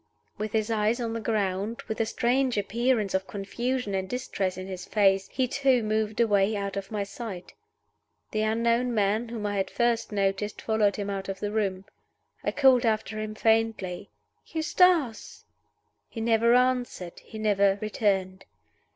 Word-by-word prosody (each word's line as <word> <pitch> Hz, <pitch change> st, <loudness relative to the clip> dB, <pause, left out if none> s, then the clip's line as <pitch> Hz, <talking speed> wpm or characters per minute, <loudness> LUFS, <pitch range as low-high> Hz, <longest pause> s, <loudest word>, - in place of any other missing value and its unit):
With 215 Hz, 0 st, -3 dB
his 220 Hz, 0 st, 0 dB
eyes 220 Hz, +2 st, +1 dB
on 230 Hz, -2 st, -2 dB
the 230 Hz, -, -2 dB
ground, 210 Hz, 0 st, -1 dB
with 220 Hz, 0 st, -2 dB
a 220 Hz, -, 0 dB
strange 250 Hz, +2 st, +1 dB
appearance 220 Hz, 0 st, 0 dB
of 190 Hz, 0 st, 0 dB
confusion 235 Hz, +3 st, -3 dB
and 190 Hz, -1 st, -2 dB
distress 200 Hz, -7 st, -2 dB
in 185 Hz, -, -5 dB
his 185 Hz, -1 st, -6 dB
face, 195 Hz, -2 st, +3 dB
he 260 Hz, -1 st, 0 dB
too 265 Hz, -2 st, +2 dB
moved 215 Hz, 0 st, -1 dB
away 210 Hz, -2 st, +3 dB
out 200 Hz, -1 st, -3 dB
of 195 Hz, -1 st, -4 dB
my 210 Hz, -2 st, -2 dB
sight. 200 Hz, -3 st, -8 dB, 0.8 s
The 215 Hz, -, 0 dB
unknown 230 Hz, +2 st, +1 dB
man 215 Hz, +3 st, +1 dB
whom 225 Hz, -3 st, -5 dB
I 205 Hz, -1 st, -1 dB
had 195 Hz, -, 0 dB
first 235 Hz, -2 st, 0 dB
noticed 200 Hz, 0 st, -1 dB
followed 215 Hz, -2 st, +1 dB
him 200 Hz, -1 st, -3 dB
out 195 Hz, 0 st, -4 dB
of 195 Hz, 0 st, -4 dB
the 205 Hz, 0 st, -3 dB
room. 195 Hz, -3 st, -1 dB, 0.6 s
I -, -, 0 dB
called 265 Hz, -4 st, +5 dB
after 220 Hz, -1 st, 0 dB
him 215 Hz, 0 st, -4 dB
faintly, 220 Hz, -5 st, 0 dB, 0.4 s
"Eustace!" 320 Hz, -6 st, +1 dB, 0.6 s
He 230 Hz, -, -7 dB
never 230 Hz, +1 st, +3 dB
answered; 250 Hz, -8 st, 0 dB
he 220 Hz, -, -11 dB
never 200 Hz, -2 st, +2 dB
returned. 195 Hz, -3 st, -1 dB
215 Hz, 160 wpm, -27 LUFS, 200-235 Hz, 0.8 s, called